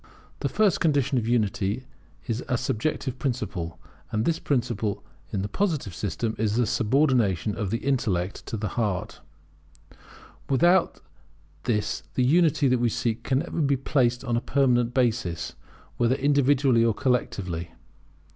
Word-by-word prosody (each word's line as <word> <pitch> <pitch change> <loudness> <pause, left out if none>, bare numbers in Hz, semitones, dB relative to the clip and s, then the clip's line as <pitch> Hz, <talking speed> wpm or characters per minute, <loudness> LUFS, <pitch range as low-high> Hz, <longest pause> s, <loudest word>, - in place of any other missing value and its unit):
The - - -1
first 210 -4 +2
condition 140 -4 +2
of 115 - -4
unity 110 0 0 0.4
is 115 -1 -2
a 125 - +2
subjective 130 +1 -2
principle; 90 - -3 0.3
and 110 0 0
this 165 -1 +1
principle 115 -6 -1 0.3
in 95 - -1
the - - -2
Positive 155 - -1
system 105 +6 -2
is 110 -1 +1
the 120 0 +3
subordination 115 - +2
of 105 -4 -2
the 115 - 0
intellect 105 -9 0
to 115 - -3
the 105 -1 -3
heart: 105 -5 -2 1.3
Without 175 +6 +3 0.6
this 105 -2 0
the 125 - +2
unity 155 -1 +4
that 125 -1 +2
we 120 0 +2
seek 115 +1 -1
can 130 +2 +1
never 170 - -3
be 140 -2 +2
placed 125 -3 +1
on 120 -3 -1
a 120 - +1
permanent 125 -4 +2
basis, 115 -9 0 0.4
whether 120 +2 +2
individually 140 -3 +3
or 115 -2 +2
collectively. 95 -10 -1
120 Hz, 145 wpm, -26 LUFS, 105-135 Hz, 1.3 s, unity